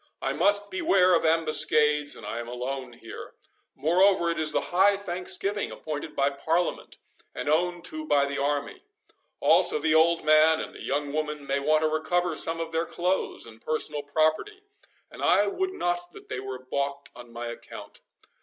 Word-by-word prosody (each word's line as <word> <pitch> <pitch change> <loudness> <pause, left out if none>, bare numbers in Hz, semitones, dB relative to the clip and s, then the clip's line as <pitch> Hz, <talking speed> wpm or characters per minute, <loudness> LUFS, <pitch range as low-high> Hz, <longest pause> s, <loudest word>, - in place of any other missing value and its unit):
"I - - -2
must 205 0 +2
beware 185 -1 +3
of 170 - +3
ambuscades, 155 -2 +2
and - - -11
I 115 - -4
am 120 - -6
alone 125 +1 -5
here. 115 -1 -11 0.4
Moreover, 175 +2 +3
it 165 - -3
is 155 -1 +2
the - - -2
High 195 +2 +4
Thanksgiving 200 +2 -2
appointed 150 0 -6
by 140 0 +2
Parliament, 165 +5 -2 0.4
and - - -5
owned 175 +3 0
to 315 0 -5
by 140 - +3
the 140 0 -4
army—also 415 - -1
the 300 - +1
old 165 +1 +4
man 155 +1 +5
and - - -6
the - - -11
young 145 +1 -2
woman 150 -1 -3
may 140 0 0
want 155 +2 +2
to 155 - +2
recover 170 +2 0
some 165 +2 +2
of 165 0 -4
their 165 +1 -1
clothes 180 +2 -2
and 115 -1 -14
personal 150 -1 -2
property, 155 - 0 0.5
and - - -11
I 200 +3 +4
would 375 - -2
not 175 - -2
that - - -14
they - - -4
were 130 0 -6
baulked 140 +2 -4
on 120 -1 -12
my 120 0 -6
account. 120 - -10
155 Hz, 175 wpm, -26 LUFS, 140-180 Hz, 0.5 s, man